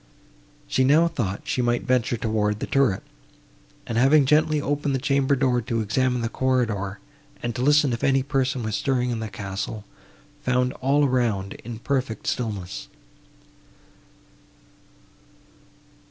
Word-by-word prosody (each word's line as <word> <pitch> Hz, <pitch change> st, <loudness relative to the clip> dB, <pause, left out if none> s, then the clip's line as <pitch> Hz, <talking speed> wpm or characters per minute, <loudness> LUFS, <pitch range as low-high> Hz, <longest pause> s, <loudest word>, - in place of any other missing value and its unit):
She 130 Hz, -, +1 dB
now 150 Hz, +6 st, +5 dB
thought 110 Hz, -, -3 dB
she 125 Hz, -, -1 dB
might 120 Hz, 0 st, +1 dB
venture 125 Hz, -1 st, +1 dB
towards 105 Hz, -2 st, 0 dB
the -, -, -4 dB
turret, 135 Hz, -9 st, +1 dB, 0.8 s
and, 115 Hz, 0 st, -1 dB
having 140 Hz, +3 st, +5 dB
gently 150 Hz, +2 st, +3 dB
opened 145 Hz, -1 st, -1 dB
the -, -, -1 dB
chamber 140 Hz, 0 st, +2 dB
door 125 Hz, -2 st, +1 dB
to 115 Hz, +1 st, -2 dB
examine 125 Hz, +3 st, 0 dB
the 115 Hz, -, 0 dB
corridor, 115 Hz, -6 st, -1 dB, 0.5 s
and 120 Hz, 0 st, -2 dB
to 125 Hz, -, -3 dB
listen 145 Hz, -1 st, +4 dB
if 115 Hz, -, -4 dB
any 135 Hz, -1 st, +3 dB
person 135 Hz, -3 st, -1 dB
was 110 Hz, -1 st, -3 dB
stirring 125 Hz, 0 st, 0 dB
in 115 Hz, -, -2 dB
the 110 Hz, -1 st, -4 dB
castle, 100 Hz, +1 st, -5 dB, 0.6 s
found 125 Hz, 0 st, +1 dB
all 140 Hz, +3 st, +3 dB
around 115 Hz, -7 st, 0 dB
in 115 Hz, 0 st, -6 dB
perfect 130 Hz, -2 st, -2 dB
stillness. 100 Hz, -6 st, -3 dB
125 Hz, 140 wpm, -24 LUFS, 110-135 Hz, 0.8 s, now